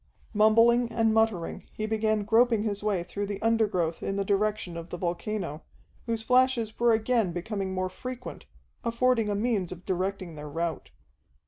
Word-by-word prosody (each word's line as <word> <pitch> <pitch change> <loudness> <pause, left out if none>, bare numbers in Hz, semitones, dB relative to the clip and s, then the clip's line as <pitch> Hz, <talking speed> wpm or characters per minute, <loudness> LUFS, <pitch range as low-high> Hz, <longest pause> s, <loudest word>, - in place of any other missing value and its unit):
Mumbling 230 +3 +4
and 225 -1 +2
muttering, 220 -6 0
he 215 - -3
began 215 -1 0
groping 225 +1 +3
his 205 -2 -2
way 205 -4 0
through 200 +3 -4
the 200 -1 -4
undergrowth 210 -8 +1
in 195 - -2
the 200 0 -1
direction 205 -3 0
of 170 0 -7
the 175 - -5
volcano, 175 -2 -3 0.5
whose 230 -1 -1
flashes 250 -2 +2
were 235 0 +4
again 220 -3 +2
becoming 195 +2 -3
more 185 0 0
frequent, 250 +6 -8 0.4
affording 235 -1 +2
a 205 - 0
means 205 -4 0
of 180 0 -9
directing 185 -1 -2
their 150 -1 -8
route. 165 +1 -3
210 Hz, 160 wpm, -28 LUFS, 185-225 Hz, 0.5 s, Mumbling